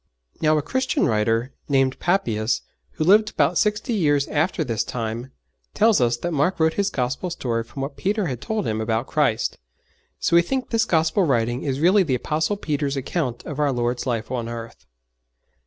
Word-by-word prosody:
Now 155 0 +3
a 150 - 0
Christian 260 - 0
writer, 115 +4 +1 0.2
named 135 -2 +2
Papias, 120 - 0 0.3
who 155 - -2
lived 210 +6 +5
about 155 +3 +1
sixty 210 +2 0
years 145 -8 +2
after 160 +5 0
this 115 -3 -1
time, 115 +2 -4 0.4
tells 220 - +4
us 120 -1 +2
that 175 +8 -3
Mark 165 +5 +1
wrote 160 0 +3
his 200 -1 0
Gospel 130 +8 -2
story 120 -9 -2
from 135 +4 -7
what 140 +1 -6
Peter 205 +1 0
had 125 -7 -4
told 220 -2 -2
him 110 0 -1
about 110 +2 -1
Christ; 130 -8 0 0.6
so - - +1
we 170 - +8
think 255 +9 -3
this 230 -1 +2
Gospel 160 +4 +2
writing 120 -4 +1
is 135 -2 -2
really 185 +6 +5
the 150 -8 +1
Apostle 160 - -1
Peter's 145 -5 -2
account 130 -3 -3
of 150 -1 -6
our 145 -2 +2
Lord's 120 0 -1
life 115 -1 -2
on 120 -2 -3
earth. 115 - -8
140 Hz, 185 wpm, -23 LUFS, 120-175 Hz, 0.6 s, we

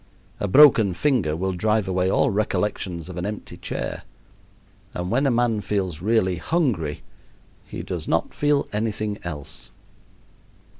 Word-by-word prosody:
A 100 - -1
broken 110 -5 +6
finger 110 - +1
will 95 +3 -1
drive 105 +2 +1
away 95 0 +1
all 130 +6 +2
recollections 95 -4 -1
of 90 -1 -8
an 90 - -3
empty 105 0 -6
chair. - - -4 0.9
And 90 +2 -3
when 135 +4 +2
a - - +4
man 120 -3 +1
feels 95 -6 -2
really 95 -3 +2
hungry 85 - -1 0.6
he - - -6
does - - -5
not - - 0
feel 145 -1 +1
anything 105 -1 -2
else. 75 -5 -6
100 Hz, 140 wpm, -23 LUFS, 90-115 Hz, 0.9 s, broken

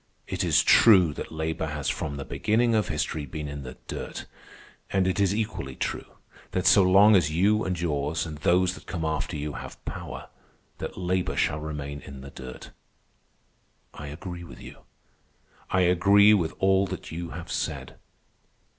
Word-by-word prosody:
It 95 0 -3
is 85 -4 +4
true 95 -9 +6
that - - -7
labor 80 0 -2
has 75 -2 -4
from 70 +3 -2
the 70 - -6
beginning 115 +2 +1
of 105 -4 +2
history 75 -2 -2
been 75 +3 -5
in 70 0 -6
the 65 -1 -9
dirt. - - -6 0.6
And 95 -1 +1
it 95 +1 0
is 100 0 +2
equally 105 -11 -3
true - - -3 0.5
that 90 - -1
so 105 0 +7
long 100 +3 +6
as 85 -5 +3
you 100 +7 +2
and 90 -2 -2
yours 75 0 -1
and 75 -3 -7
those 90 +3 +3
that - - -13
come 85 -2 -3
after 80 +1 -2
you 75 0 -4
have - - -9
power, - - -7 0.5
that - - -6
labor 90 0 -1
shall 75 - +1
remain 75 -2 -5
in 70 -1 -10
the 70 +1 -10
dirt. 65 -2 -10 1.2
I 75 - -8
agree 85 +4 -7
with 85 - -12
you. - - -11 0.9
I 95 - +2
agree 100 +4 +6
with 85 -6 0
all 95 0 +3
that - - -7
you 85 +1 -5
have 85 - -8
said. - - -4
85 Hz, 170 wpm, -26 LUFS, 75-95 Hz, 1.2 s, so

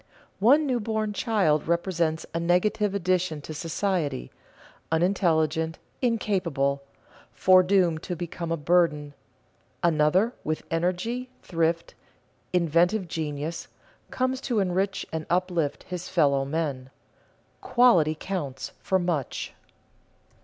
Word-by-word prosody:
One 275 +10 +5
new 255 -3 0
born 215 -1 -2
child 195 -10 +1
represents 170 -2 0
a 165 - -1
negative 200 +4 +1
addition 185 -4 0
to 155 - -7
society, 165 - -2 0.6
unintelligent, 160 -2 +1 0.2
incapable, 175 - 0 0.5
foredoomed 185 -3 +4
to 180 - -4
become 170 0 -5
a 165 - 0
burden; 150 -2 +1 0.7
another, 170 +7 +3
with 155 0 -2
energy, 185 +10 -1
thrift, 165 -1 -1 0.6
inventive 175 +3 +2
genius, 155 0 -4 0.4
comes 255 0 -1
to 245 -5 -1
enrich 195 +1 0
and 160 -1 -3
uplift 175 -4 0
his 180 -1 -6
fellow 140 -6 +2
men. 140 -3 -3 0.7
Quality 240 -12 +4
counts 155 -9 -4
for 190 - +1
much. 175 -7 -2
175 Hz, 105 wpm, -26 LUFS, 155-195 Hz, 0.7 s, One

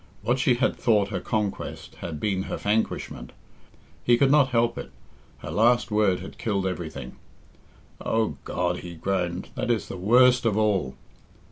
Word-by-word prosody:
What 125 +3 +1
she 125 -1 +3
had 130 +2 +1
thought 105 -4 +2
her 95 -3 -2
conquest 105 0 -3
had 80 -3 -6
been 95 +1 0
her - - -2
vanquishment. 105 - -2 0.7
He 120 -1 +4
could 135 +1 +3
not 145 -2 +5
help, 120 -1 +1
it - - -7 0.5
her - - -5
last 120 +2 +3
word 105 -4 +2
had 95 - -10
killed 100 -4 -1
everything. 80 -9 -5 0.9
"Oh, 110 -1 0
God," 90 0 -1
he 85 -1 -8
groaned, 90 0 -2
"that - - -3
is 115 -4 0
the - - -5
worst 125 +6 +5
of 110 -3 +1
all." 100 -11 +1
105 Hz, 160 wpm, -25 LUFS, 90-120 Hz, 0.9 s, not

